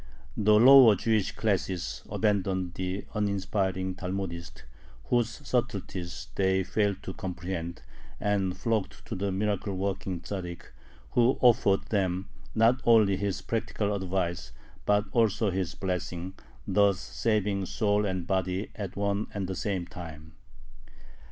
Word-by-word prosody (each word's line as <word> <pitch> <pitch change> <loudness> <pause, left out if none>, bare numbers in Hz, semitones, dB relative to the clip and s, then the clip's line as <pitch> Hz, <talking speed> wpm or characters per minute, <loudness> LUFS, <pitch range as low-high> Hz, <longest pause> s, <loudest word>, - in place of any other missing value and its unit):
The 105 0 +4
lower 125 -1 +9
Jewish 110 0 +1
classes 95 -4 -1
abandoned 95 -4 0
the 95 +2 -3
uninspiring 95 -2 -1
Talmudist, 90 -2 -5 0.4
whose 120 +3 -1
subtleties 100 -7 -3
they 95 0 +2
failed 100 0 0
to 95 - -5
comprehend, 90 -3 -5 0.4
and 100 -3 0
flocked 110 -4 -2
to - - -6
the 100 +1 -1
miracle 100 0 -1
working 95 -1 -2
Tzaddik, 90 -2 -5 0.5
who 120 +2 +3
offered 110 -5 +4
them, 95 -2 0 0.3
not 115 +3 +4
only 110 -4 +5
his 100 0 -2
practical 105 -2 -1
advice, 95 -3 -2 0.4
but 105 0 +3
also 110 -3 +2
his 90 -2 -2
blessing, 90 -1 -3 0.3
thus 100 -1 +3
saving 105 -4 -1
soul 105 +1 +1
and 95 -3 -2
body 95 +1 -1
at 100 -4 -5
one 100 +1 0
and 100 -2 -2
the 95 - -3
same 95 -2 -2
time. 80 -3 -10
95 Hz, 125 wpm, -28 LUFS, 95-105 Hz, 0.5 s, lower